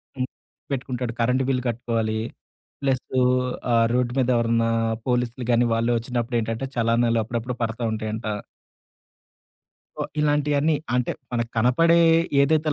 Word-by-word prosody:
హ్మ్ 130 -1 -2 0.4
పెట్టుకుంటాడు. 125 -3 -3
Current 125 +3 +2
bill 125 -1 +1
కట్టుకోవాలి. 115 -2 -1 0.6
ప్లసు 130 -1 0 0.5
ఆ - - +3 0.2
రోడ్డు 125 -1 +1
మీద 130 -1 +2
ఎవరన్నా 115 0 +2 0.4
పోలీసులు 125 0 -1
గాని, 120 +1 +4
వాళ్ళు 115 +1 +1
ఒచ్చినప్పుడు 120 0 -2
ఏంటంటే 115 +4 -3
చలానాలు 115 0 +2
అప్పుడప్పుడు 115 +2 -4
పడతా 115 +1 -3
ఉంటాయంట. 110 +1 -4 1.7
సో, - - -3 0.2
ఇలాంటియన్నీ 150 +1 +2 0.2
అంటే 125 -1 +1 0.2
మనకు 115 -1 -1
కనపడే 165 +9 +4 0.4
ఏదైతే 155 +2 +2
120 Hz, 120 wpm, -24 LUFS, 115-130 Hz, 1.7 s, గాని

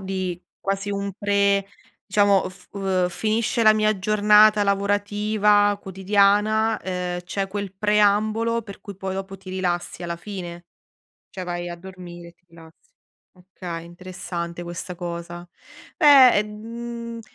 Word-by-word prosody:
di 185 -2 -4 0.2
quasi 195 +1 -3
un 200 0 -3
pre 200 -1 +2 0.4
diciamo, 200 -1 +3
f 185 0 -13
uhm, 190 -2 0
f - - -11
finisce 225 +2 0
la 215 - +7
mia 215 -1 +1
giornata 210 +1 +5
lavorativa 205 +1 +2
quotidiana, 205 +3 +2
uhm, 180 -1 -3
c'è 195 +2 -3
quel 200 -1 -5
preambolo 210 +3 +2
per 200 -2 -11
cui 200 -3 -10
poi 190 0 -4
dopo 195 0 -6
ti 190 0 -15
rilassi 180 -2 -3
alla 170 0 -4
fine, 175 -2 -8 0.7
cioè 185 - -6
vai 175 0 -4
a 175 - -6
dormire 175 -1 -11
e - - -17
ti 175 - -43
rilassi. 165 - -18 0.4
Okay, 180 -2 -8
interessante 175 -1 -6
questa 175 +1 -6
cosa. 175 0 -7 0.5
Eh, 270 -9 +7
mhmm, 230 +2 -7
195 Hz, 135 wpm, -23 LUFS, 180-210 Hz, 0.7 s, la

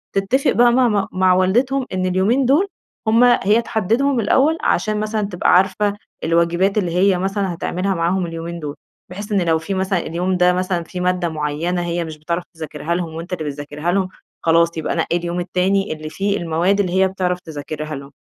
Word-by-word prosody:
تتفق 200 +8 +2
بقى 240 0 +5
مع 250 +1 +4
ما 205 -3 +1
مع 185 0 +3
والدتهم 245 +9 +2
إن 185 0 -1
اليومين 195 +9 +2
دول 295 +10 +3 0.4
هم 225 +2 +5
هي 235 -3 +4
تحددهم 235 +5 0
الأول، 285 +8 +3
عشان 215 -1 +1
مثلًا 215 0 -1
تبقى 180 -3 +1
عارفة 190 +3 +3 0.3
الواجبات 170 +4 +2
اللي 180 -5 0
هي 190 +1 +3
مثلًا 195 0 -1
هتعملها 185 +3 -2
معاهم 175 +2 0
اليومين 165 +1 -6
دول. 150 -2 -5 0.3
بحيث 205 +4 -7
إن 200 - +2
لو 165 -2 +2
في 160 +5 -4
مثلًا، 190 -1 0
اليوم 180 +3 -1
ده 180 0 +4
مثلًا 180 -1 -1
في 180 +2 -7
مادة 180 -1 0
معينة 160 +3 -2
هي 175 0 -2
مش 160 -1 -8
بتعرف 170 +3 -3
تذاكرها 160 0 -4
لهم 170 -2 -3
وأنتَ 170 +3 -6
اللي 170 - -3
بتذاكرها 145 +3 -3
لهم، 190 0 0 0.3
خلاص 170 0 +3
يبقى 160 - -2
نَقِّي 170 +1 0
اليوم 175 0 -3
التاني 190 +2 0
اللي 155 0 -7
فيه 200 +4 -1
المواد 175 +4 +1
اللي 185 -3 0
هي 190 0 +4
بتعرف 180 -1 -2
تذاكرها 155 -2 -6
لهم. 140 0 -9
180 Hz, 190 wpm, -19 LUFS, 170-200 Hz, 0.4 s, بقى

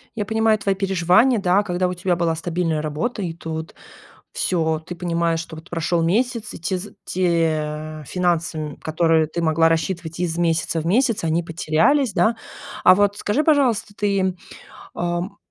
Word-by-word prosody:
Я 210 - -2
понимаю 220 0 +2
твои 200 -1 0
переживания, 195 +5 +3
да, 195 +1 +2
когда 180 -2 -1
у 180 - -2
тебя 180 0 0
была 170 -1 0
стабильная 165 -1 -1
работа, 155 +9 -3
и 170 -3 -3
тут 160 -1 -6 0.6
всё, 160 -3 0
ты 160 +3 -8
понимаешь, 170 -1 -1
что 165 -1 -8
вот 160 +2 -13
прошёл 165 0 0
месяц, 225 +5 0
и - - -7
те 185 +2 -1
з 200 +2 -9
те 155 -3 -1
финансы, 175 -3 0
м, 150 -2 -5
которые 160 0 +1
ты 170 +2 -4
могла 165 0 +3
рассчитывать 165 0 -2
из 170 -2 -1
месяца 165 -1 0
в 160 - -5
месяц, 230 0 +2
они 165 +1 +1
потерялись, 180 - +1
да. 225 +1 +2 0.5
А - - +8
вот 205 +1 +2
скажи, 210 +10 0
пожалуйста, 265 -9 +2
ты, 195 -3 0 0.6
ам, 175 +3 -3
175 Hz, 165 wpm, -21 LUFS, 165-200 Hz, 0.6 s, А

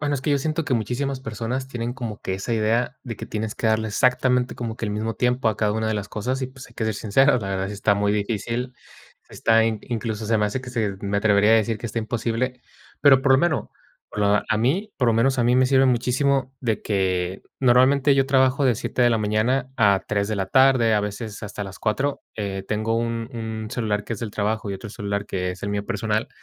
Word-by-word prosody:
bueno, 145 -1 0
es - - -5
que 145 - -1
yo 140 - +3
siento 155 +2 -2
que 135 -5 0
muchísimas 130 +4 -2
personas 120 +3 -4
tienen 120 -2 -4
como 120 -5 -6
que 95 - -3
esa 95 +5 -4
idea, 115 +3 0
de 115 -3 -5
que - - -8
tienes 110 0 -4
que 110 - 0
darle 110 0 +1
exactamente 125 +3 +1
como 115 -1 -4
que - - -4
el 105 - -2
mismo 110 +2 -2
tiempo 125 -1 +1
a 110 - -1
cada 105 -1 +1
una 110 +1 -1
de 110 - 0
las 105 -1 -4
cosas 130 +6 -3
y, 130 - -2
pues, 130 0 -12
hay 120 - -20
que 110 - -2
ser 110 -2 -1
sincero, 125 +6 +3
la 100 -3 -4
verdad 95 0 -2
sí - - -5
está 100 +1 +2
muy 100 0 +1
difícil. 115 +4 -2 0.5
Está 115 0 +3
in 110 -1 0
incluso, 110 -2 -4
se 115 - +2
me 105 - +2
hace 125 +5 -3
que 125 - -9
se 110 -6 -1
me 100 0 0
atrevería 105 0 +4
a - - +8
decir 110 0 +1
que 120 - -5
está 115 +1 -3
imposible. 120 +2 -2 0.4
Pero, 135 -2 +6
por 140 - +2
lo 130 - +6
menos 155 - 0 0.4
por - - -7
lo 105 0 +3
a 110 - +1
mí, 180 - 0
por 125 - +1
lo 115 - +3
menos 130 +4 +2
a 120 - +2
mí 125 +1 +3
me 130 0 +4
sirve 135 0 +4
muchísimo 130 +2 +1
de 110 -5 -1
que 95 -2 -1 0.2
normalmente 130 +3 +4
yo 135 -1 +2
trabajo 130 +1 +3
de 125 -4 +3
7 125 - -1
de 120 - +5
la 115 - +2
mañana 115 +5 0
a 100 -4 +3
3 100 -1 0
de 110 - -1
la 95 -1 -1
tarde, 130 -1 +4
a 105 - +3
veces 105 +1 -5
hasta 105 0 -5
las 95 -1 -9
4. 135 +6 -1
Eh, 100 -2 -4
tengo 110 +1 0
un 115 0 -2
un 110 -2 -5
celular 105 -4 -1
que 115 - -5
es - - -9
del 115 - -4
trabajo 110 +1 -1
y - - -2
otro 95 +2 -8
celular 100 -1 -3
que 90 -2 -2
es 95 - -13
el - - -2
mío 100 0 -2
personal. 110 0 -1
115 Hz, 250 wpm, -23 LUFS, 105-130 Hz, 0.5 s, a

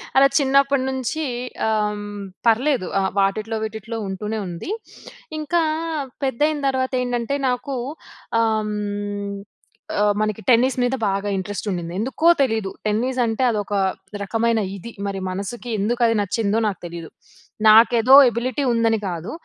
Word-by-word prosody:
అలా 275 +1 +7
చిన్నప్పటి 275 -1 +3
నుంచి 265 +4 -2 0.4
ఆహ్, 210 -1 0 0.4
పర్లేదు 245 -2 +2
ఆహ్, 190 0 +1
వాటిట్లో, 215 +3 0
వీటిట్లో 220 +1 -5
ఉంటూనే 210 +3 -4
ఉంది. 175 - -6 0.7
ఇంకా 335 +3 +1 0.6
పెద్దయిన 295 +3 +1
తర్వాత 260 -1 0
ఏంటంటే, 245 +2 -1
నాకు 255 +2 -2 0.7
ఆహ్, 215 -1 0 1.3
ఆహ్, 205 0 +4
మనకి 215 0 -1
టెన్నిస్ 255 +2 +4
మీద 250 +2 +1
బాగా 200 +1 -1
ఇంట్రెస్ట్ 200 +2 -4
ఉండింది. 170 -1 -4
ఎందుకో 265 +8 0 0.2
తెలీదు. 220 -6 -1 0.2
టెన్నిస్ 250 +5 0
అంటే 225 +3 -1
అదొక 205 -1 -3 0.5
రకమైన 225 +2 +1 0.2
ఇది. 235 +5 -9 0.2
మరి 195 -1 -3
మనసుకి 200 +6 -5
ఎందుకు 235 +4 -1
అది 230 - +2
నచ్చిందో, 205 +1 0
నాకు 195 - -6
తెలీదు. 170 -1 -8 0.6
నాకేదో 230 +3 +7
ఎబిలిటీ 250 +4 -2
ఉందని 225 -1 +2
కాదు. 170 +2 -5
225 Hz, 125 wpm, -22 LUFS, 205-255 Hz, 1.3 s, అలా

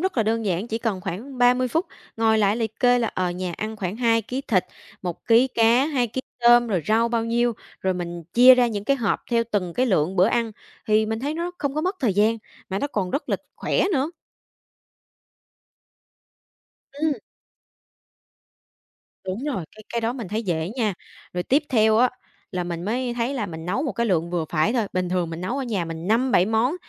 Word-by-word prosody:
rất 380 -2 -1
là 230 - +4
đơn 225 +1 0
giản, 190 +1 -1
chỉ 225 - -2
cần 220 -5 -2
khoảng 240 +10 -6
30 250 +1 +4
phút, 325 - 0 0.3
ngồi 220 -1 +3
lại 205 +1 +3
liệt 225 -2 -4
kê 245 -1 +5
là, 230 -2 0
ờ, 180 -1 0
nhà 180 0 -4
ăn 220 +1 -4
khoảng 190 0 -3
2 230 -1 +2
ký 250 +5 -4
thịt, 205 -9 +1 0.4
1 175 -3 -5
ký 240 +3 +5
cá, 235 +3 +3
2 260 -6 +1
ký 235 +4 -4 0.2
tôm, 240 0 +6
rồi 185 -6 0
rau 225 +2 +3
bao 230 -1 0
nhiêu, 235 +1 +1 0.3
rồi 190 -1 0
mình 175 -1 -5
chia 250 +2 +9
ra 250 -1 +3
những 205 -3 -3
cái 275 +5 +2
hộp 225 -6 0
theo 235 -1 +3
từng 180 -5 -1
cái 255 +1 +2
lượng 185 -2 +1
bữa 185 +1 +5
ăn, 230 -1 0 0.3
thì 215 0 +3
mình 220 0 -2
thấy 290 +4 -2
nó 340 +2 -3
không 280 -1 -2
có 305 - 0
mất 370 +4 -1
thời 230 -8 +1
gian, 215 +3 +3 0.3
mà 195 - -2
nó 285 - -1
còn 200 -9 -2
rất 280 - -3
là - - +1 0.2
khỏe - - 0
nữa. 285 0 +1 2.8
Ừm. 300 +1 0 2.1
Đúng 190 +8 -4
rồi, 255 - -2
cái 215 - -12
cái 235 - 0
đó 230 +1 0
mình 235 -7 -6
thấy 215 +4 -2
dễ 170 -4 -1
nha. 215 -6 0 0.4
Rồi 180 - -2
tiếp 275 - +2
theo 220 -3 +4
á, 245 +2 +4 0.4
là 180 -1 -2
mình 170 -1 -4
mới 240 +4 -1
thấy 240 +3 -1
là 230 -6 -2
mình 160 -2 -7
nấu 205 +10 0
một 290 - -2
cái 235 - -1
lượng 170 -4 0
vừa 175 -2 -1
phải 160 +7 +2
thôi, 230 -5 +1
bình 180 -1 -1
thường 175 -2 -1
mình 165 - -6
nấu 195 +10 -2
ở 275 - -2
nhà 210 -8 -1
mình 165 +1 -6
5-7 225 -3 +3
món, 225 - +1
225 Hz, 215 wpm, -24 LUFS, 185-245 Hz, 2.8 s, chia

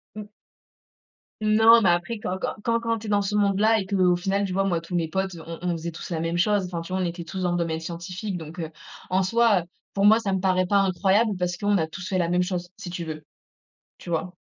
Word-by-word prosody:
Mmh. 210 -1 -6 1.2
Non, 220 +2 +6
mais 190 - +4
après 175 +6 0
quand 185 -2 -3
quand - - -3
quand 230 0 +1
quand 230 -1 -1
tu 215 - -8
es - - -4
dans 205 -1 +2
ce 200 +1 -3
monde-là 210 +2 +3
et 190 - -4
qu'au 185 -2 +3
final, 195 +3 0
tu 190 - -4
vois, 195 +1 +1
moi, 180 -4 +1
tous 170 +2 -11
mes 165 -2 +1
potes, 190 +3 -2
heu, 165 - -9
on 165 0 -6
on 180 - 0
faisait 170 0 -4
tous 165 - -9
la 165 - -1
même 165 +1 -1
chose, 200 +2 +2
enfin, 175 -2 -4
tu 170 +2 -7
vois, 190 - 0
on - - 0
était 170 0 -4
tous 185 +3 -6
dans 180 -1 +1
le 175 - 0
domaine 165 -2 -1
scientifique, 180 +4 -5
donc 165 +1 -9
heu, 160 -2 -3 0.4
en 185 +1 +2
soi, 225 0 +3
heu, - - -9 0.3
pour 200 0 +2
moi, 215 +2 +7
ça 200 -4 -2
me 190 - +1
paraît 185 -1 +1
pas 200 - +3
incroyable 195 +3 +2
parce 180 0 -2
qu'on 205 0 +1
a 160 - 0
tous 180 +3 -8
fait 185 -2 0
la 170 -1 +1
même 180 +1 +2
chose, 180 -1 -3
si 175 - -7
tu 175 -1 -4
veux. 155 -1 -6 0.8
Tu - - -12
vois? 175 +2 -2
185 Hz, 270 wpm, -25 LUFS, 175-205 Hz, 1.2 s, moi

